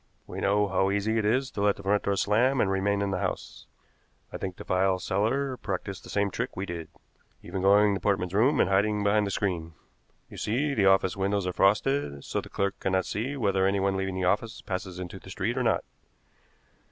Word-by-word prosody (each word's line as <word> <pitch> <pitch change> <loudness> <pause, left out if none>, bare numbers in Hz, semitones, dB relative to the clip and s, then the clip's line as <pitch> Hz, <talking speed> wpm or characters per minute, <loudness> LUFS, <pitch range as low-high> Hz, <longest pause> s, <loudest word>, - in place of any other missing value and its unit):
We - - -7
know 105 +1 +2
how 95 0 +1
easy 105 +3 0
it 105 - -1
is 130 +5 +1
to 100 - -4
let 100 -1 +3
the 100 - -11
front 100 +1 +2
door 100 - 0
slam 120 +7 +2
and 95 - +2
remain 100 +1 +1
in 100 - -1
the - - -1
house. - - -5 0.7
I - - -3
think 95 -2 -5
the - - -9
file 95 0 +2
seller 115 +9 0
practiced 100 -3 -5
the - - -12
same 100 -1 0
trick 125 +6 -4
we 95 - -2
did. 85 -3 -6 0.6
Even 90 +2 -4
to 95 - +2
going 100 +1 +5
to 95 - -3
Portman's 95 -2 0
room 125 +8 +3
and - - +4
hiding 105 +2 +2
behind 105 0 +2
the - - -2
screen. 90 -5 -2 0.5
You - - -12
see, 140 +7 0
the 100 -6 +3
office 95 0 +3
windows 100 0 0
are 90 - -2
frosted, 100 - +1
so - - -2
the - - -12
clerk 100 0 -2
cannot 95 -1 0
see 130 +7 -3
whether 95 -5 +2
anyone 100 0 +1
leaving 95 -1 -2
the 95 -1 -1
office 110 +5 0
passes 95 -1 -4
into 90 +1 -7
the 95 - -14
street 105 +5 -2
or 130 - 0
not. 115 -3 +1
100 Hz, 220 wpm, -27 LUFS, 95-105 Hz, 0.7 s, going